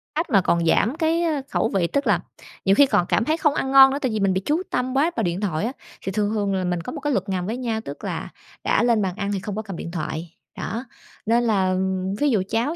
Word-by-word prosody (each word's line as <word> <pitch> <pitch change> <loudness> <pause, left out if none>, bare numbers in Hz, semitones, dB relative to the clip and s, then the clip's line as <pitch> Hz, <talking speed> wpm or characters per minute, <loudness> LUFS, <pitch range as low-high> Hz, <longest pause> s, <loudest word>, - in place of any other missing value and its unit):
Cách 325 +3 -1
mà 195 -3 +4
còn 170 -1 +1
giảm 225 - +2
cái, 330 +1 +1
ơ, 305 -4 0
khẩu - - +1
vị. 185 -5 +1
Tức 280 +7 -1
là - - +3 0.5
nhiều 195 - +5
khi 285 - +7
còn 180 -9 +2
cảm 230 - +2
thấy 315 +4 +1
không 300 -3 +2
ăn 265 -3 -2
ngon 270 0 +9
nữa, 275 - -1
tại 260 - 0
vì 215 - -1
mình 195 -2 +2
bị 190 - 0
chú 320 +5 +1
tâm 255 +1 -1
quá 300 +5 +2
vào - - 0
điện 175 +3 -1
thoại 185 -1 -1
á. 245 - -1 0.3
Thì 195 - -3
thường 205 +1 0
thường 205 -2 0
là 190 -1 0
mình 180 -1 -1
có - - -6
một 300 - -6
cái 295 -2 0
luật 195 -1 -1
ngầm 180 -2 -1
với 225 +4 -3
nhau, 230 -3 -2
tức 140 - -8
là - - -4 0.3
đã - - +2
lên 235 -3 +3
bàn 185 -2 -2
ăn 200 -1 -3
thì 195 - -1
không 200 +1 -5
có 215 - -2
cầm 200 -4 -7
điện 170 - -6
thoại, 165 0 -5 0.2
đó. 230 +3 -4 0.4
Nên 235 +2 +3
là 190 -5 +2 0.4
ví 290 0 +3
dụ 205 -7 +2
cháu 240 +8 0
215 Hz, 280 wpm, -23 LUFS, 190-270 Hz, 0.5 s, ngon